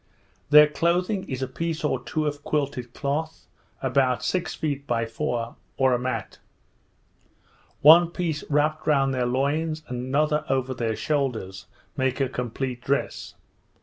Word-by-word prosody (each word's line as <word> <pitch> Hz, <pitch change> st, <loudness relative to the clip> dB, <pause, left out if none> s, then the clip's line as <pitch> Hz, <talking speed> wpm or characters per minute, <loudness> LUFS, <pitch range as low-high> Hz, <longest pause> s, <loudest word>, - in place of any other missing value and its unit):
Their 150 Hz, 0 st, +9 dB
clothing 175 Hz, +6 st, 0 dB
is 130 Hz, -1 st, -3 dB
a -, -, -2 dB
piece 165 Hz, +5 st, -3 dB
or 130 Hz, -4 st, 0 dB
two 155 Hz, +3 st, -2 dB
of 145 Hz, -1 st, -3 dB
quilted 140 Hz, -5 st, -2 dB
cloth, 150 Hz, +4 st, -3 dB, 0.4 s
about 130 Hz, -3 st, +2 dB
six 180 Hz, -2 st, -1 dB
feet 145 Hz, -2 st, -3 dB
by 115 Hz, -2 st, 0 dB
four, 115 Hz, -1 st, -3 dB, 0.2 s
or 130 Hz, -1 st, +3 dB
a 120 Hz, -, +1 dB
mat. 130 Hz, +1 st, -4 dB, 1.4 s
One 165 Hz, +3 st, +8 dB
piece 170 Hz, -4 st, -3 dB
wrapped 155 Hz, +2 st, +1 dB
round 135 Hz, -3 st, +3 dB
their 125 Hz, -1 st, 0 dB
loins, 155 Hz, +5 st, -1 dB
and 125 Hz, 0 st, -4 dB
another 150 Hz, +2 st, +1 dB
over 130 Hz, -1 st, 0 dB
their 115 Hz, -3 st, -2 dB
shoulders, 120 Hz, -10 st, -2 dB, 0.3 s
make 130 Hz, 0 st, 0 dB
a 135 Hz, -, +2 dB
complete 125 Hz, 0 st, -4 dB
dress. 140 Hz, +3 st, -2 dB
140 Hz, 145 wpm, -25 LUFS, 125-155 Hz, 1.4 s, Their